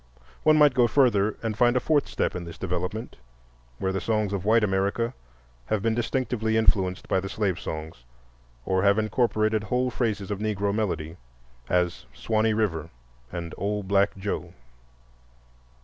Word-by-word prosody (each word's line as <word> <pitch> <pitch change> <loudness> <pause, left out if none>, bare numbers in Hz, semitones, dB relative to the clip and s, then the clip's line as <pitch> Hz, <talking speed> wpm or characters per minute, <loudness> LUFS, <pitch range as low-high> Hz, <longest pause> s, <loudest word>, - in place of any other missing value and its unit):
One 155 0 +5
might 150 -3 +6
go 125 -2 +4
further 110 -5 +3
and 110 -1 -1
find 120 +3 +3
a - - +4
fourth 145 +2 +1
step - - -1
in 90 - -4
this 85 -1 -9
development, 90 +5 -4 0.6
where 95 - -1
the 95 - -2
songs 105 -3 0
of 95 -2 -3
white 110 +1 +4
America 100 +4 0 0.5
have 105 -2 -1
been 115 -1 +2
distinctively 115 -2 0
influenced 95 -4 +2
by 95 - +2
the 95 +1 -5
slave 95 -4 -1
songs 80 -5 -6 0.6
or 95 0 +1
have 100 +1 +4
incorporated 110 -1 +1
whole 125 +3 0
phrases 105 -5 -2
of 100 - -2
Negro 100 -2 -1
melody, 85 -6 -2 0.5
as 90 -1 0
"Swanee 110 0 +1
River" 85 -8 -1 0.4
and 85 -1 -5
"Old 100 0 -2
Black 100 +1 +2
Joe." 100 +1 -4
105 Hz, 155 wpm, -26 LUFS, 95-115 Hz, 0.6 s, might